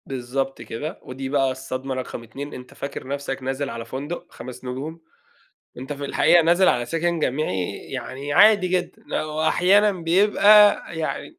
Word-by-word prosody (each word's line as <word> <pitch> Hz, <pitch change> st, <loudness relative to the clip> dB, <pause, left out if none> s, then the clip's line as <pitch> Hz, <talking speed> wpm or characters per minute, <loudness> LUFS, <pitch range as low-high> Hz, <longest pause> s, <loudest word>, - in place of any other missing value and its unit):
بالضبط 135 Hz, 0 st, -3 dB
كده، 115 Hz, +7 st, -6 dB
ودي 130 Hz, +1 st, -6 dB
بقى 135 Hz, -1 st, +2 dB
الصدمة 130 Hz, 0 st, -5 dB
رقم 130 Hz, -2 st, -6 dB
2 140 Hz, +6 st, -8 dB
أنت 125 Hz, 0 st, -10 dB
فاكر 140 Hz, -1 st, -7 dB
نفسك 135 Hz, -1 st, -4 dB
نازل 135 Hz, +2 st, -2 dB
على 115 Hz, -2 st, -6 dB
فندق 140 Hz, +8 st, -6 dB
5 130 Hz, +1 st, -10 dB
نجوم. 145 Hz, +6 st, -6 dB, 0.8 s
أنت 130 Hz, +3 st, -5 dB
في 145 Hz, 0 st, -6 dB
الحقيقة 175 Hz, +4 st, +4 dB
نازل 175 Hz, +3 st, +4 dB
على 120 Hz, -, +2 dB
سكن 165 Hz, +4 st, -1 dB
جامعي 125 Hz, -, -1 dB
يعني 140 Hz, +2 st, -5 dB
عادي 205 Hz, -1 st, +6 dB
جدًا، 180 Hz, -1 st, -2 dB
آآ، -, -, -1 dB
وأحيانًا 180 Hz, +7 st, +3 dB
بيبقى 205 Hz, +4 st, +5 dB
يعني 160 Hz, -, -4 dB
140 Hz, 155 wpm, -23 LUFS, 130-170 Hz, 0.8 s, عادي